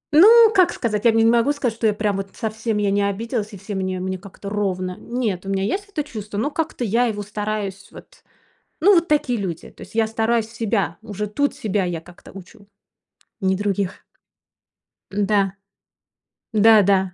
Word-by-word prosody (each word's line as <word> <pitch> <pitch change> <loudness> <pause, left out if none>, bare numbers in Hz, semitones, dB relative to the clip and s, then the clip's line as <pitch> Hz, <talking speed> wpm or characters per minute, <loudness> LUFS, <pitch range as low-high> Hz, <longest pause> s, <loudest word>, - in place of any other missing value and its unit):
Ну, 445 +6 +8
как 370 -3 +4
сказать? 215 -2 -2
Я 230 - +7
не 225 0 +3
могу 235 +4 +4
сказать, 265 -6 -1
что 225 -1 +1
я 210 - +2
прям 205 -1 -1
вот 195 0 -6
совсем 220 0 -2
я 205 -1 +1
не 200 +1 +2
обиделась, 215 +2 -2
и - - -7
все 195 +3 -7
мне 185 -1 -2
мне 185 0 -3
как-то 200 +1 -11
ровно. 185 -3 -2
Нет, 230 -7 -3
у - - -3
меня 195 -1 0
есть 400 - -2
это 310 -7 -3
чувство, 210 -6 -7
но 285 +8 -1
как-то 310 -5 -3
я 235 +3 +2
его 205 -2 -3
стараюсь 205 -1 -4
вот. - - -15 0.6
Ну, 400 +5 +6
вот 340 -1 +2
такие 255 -6 +1
люди, 175 -4 -5
то - - -19
есть 205 - -11
я 225 -1 +3
стараюсь 225 0 0
себя, 205 -7 -2
уже 210 -2 -4
тут 285 +8 -1
себя 205 -2 -1
я 175 -2 -3
как-то 175 +1 -16
учу, 200 +2 -14 0.7
не 190 0 +1
других. 200 -2 -2 1.3
Да, 195 -2 +2 1.0
да-да. 210 -3 +5
210 Hz, 180 wpm, -21 LUFS, 195-230 Hz, 1.3 s, Ну